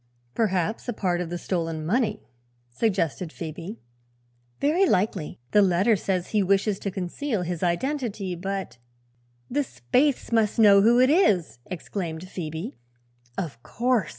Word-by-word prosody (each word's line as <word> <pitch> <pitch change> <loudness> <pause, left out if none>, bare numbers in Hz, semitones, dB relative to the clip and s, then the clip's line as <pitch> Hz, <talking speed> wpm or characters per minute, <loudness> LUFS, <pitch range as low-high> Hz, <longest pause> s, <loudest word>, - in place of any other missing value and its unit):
"Perhaps 210 +2 0
a - - 0
part 180 -4 0
of 175 - -4
the 175 - -3
stolen 165 -3 -2
money," 210 +3 0 0.5
suggested 180 - 0
Phoebe. 170 +7 -7 0.8
"Very 340 +7 +3
likely. 185 - 0
The 210 - +6
letter 195 +4 +4
says 185 -2 -2
he 215 - +2
wishes 195 +1 +2
to 200 - -3
conceal 195 +4 -2
his 175 -1 -3
identity, 205 - -1
but 190 -5 -4 0.3
" - - -41 0.3
"The 285 - +1
Spaythes 250 - 0
must 220 -2 +2
know 205 -3 +7
who 235 +4 +5
it 255 +2 +5
is!" 185 - +3
exclaimed 175 -2 -5
Phoebe. 160 -7 -5 0.6
"Of 135 -11 -4
course." 240 - 0
195 Hz, 140 wpm, -25 LUFS, 175-225 Hz, 0.8 s, know